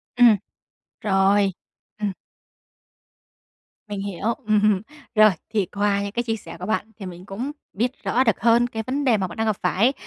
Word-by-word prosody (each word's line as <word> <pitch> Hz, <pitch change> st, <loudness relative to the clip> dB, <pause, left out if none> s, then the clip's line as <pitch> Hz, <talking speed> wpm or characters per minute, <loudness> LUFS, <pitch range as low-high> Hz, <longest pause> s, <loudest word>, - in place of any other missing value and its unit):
Ừm. 240 Hz, -3 st, +7 dB, 0.7 s
Rồi. 195 Hz, 0 st, +3 dB, 0.5 s
Ừm. 205 Hz, -2 st, 0 dB, 1.8 s
Mình 205 Hz, -1 st, -4 dB
hiểu. 200 Hz, +3 st, -2 dB
Ừm. 210 Hz, -2 st, +3 dB, 0.3 s
Rồi, 215 Hz, 0 st, +8 dB, 0.2 s
thì 205 Hz, -3 st, +2 dB
qua 200 Hz, +2 st, 0 dB
những 200 Hz, 0 st, -3 dB
cái 240 Hz, +2 st, -1 dB
chia 225 Hz, -2 st, -1 dB
sẻ 170 Hz, -6 st, -10 dB
của 180 Hz, -, -5 dB
bạn 220 Hz, +1 st, -1 dB
thì 195 Hz, -, -6 dB
mình 180 Hz, 0 st, -9 dB
cũng 225 Hz, +8 st, -4 dB, 0.2 s
biết 235 Hz, +5 st, 0 dB
rõ 255 Hz, -, +2 dB
được 225 Hz, -5 st, +2 dB
hơn 235 Hz, +2 st, +4 dB
cái 220 Hz, -2 st, -4 dB
vấn 280 Hz, +3 st, -1 dB
đề 230 Hz, -4 st, +4 dB
mà 190 Hz, -, -1 dB
bạn 175 Hz, -, -10 dB
đang 225 Hz, -, 0 dB
gặp 215 Hz, -3 st, +1 dB
phải, 210 Hz, +9 st, +3 dB
210 Hz, 180 wpm, -23 LUFS, 195-230 Hz, 1.8 s, Rồi